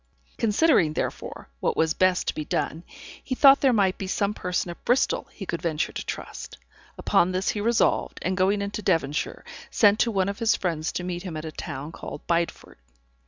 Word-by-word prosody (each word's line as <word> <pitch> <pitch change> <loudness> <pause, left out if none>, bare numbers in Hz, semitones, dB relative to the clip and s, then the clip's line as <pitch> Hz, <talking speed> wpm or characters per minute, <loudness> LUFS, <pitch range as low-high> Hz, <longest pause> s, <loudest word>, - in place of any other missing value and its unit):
Considering, 220 - +3
therefore, - - -4
what - - -1
was 160 0 +2
best 185 -1 +2
to - - +1
be 155 - -4
done, 160 +2 -2 0.4
he 255 - -3
thought 275 +1 +7
there 270 - +5
might 195 -5 +2
be 195 - -4
some 200 +2 0
person 180 -2 -2
at 170 - -13
Bristol 245 +2 +1
he 195 - -8
could 170 -2 -4
venture 160 -2 -1
to - - -5
trust. - - -7 0.4
Upon 175 - +2
this 185 +1 0
he 210 - -1
resolved, 230 +2 +1
and 185 +1 0
going 195 +2 +2
into 200 +1 -4
Devonshire, 165 -7 -1 0.2
sent 210 -1 +4
to 235 - +3
one 195 -4 +1
of 200 +1 -4
his 230 -2 +3
friends 165 -3 -2
to 180 - -3
meet 175 -1 -4
him 175 -4 -6
at 155 - -6
a 160 - -5
town 145 0 -6
called 150 - -9
Bideford. 170 0 -2
185 Hz, 200 wpm, -25 LUFS, 165-205 Hz, 0.4 s, thought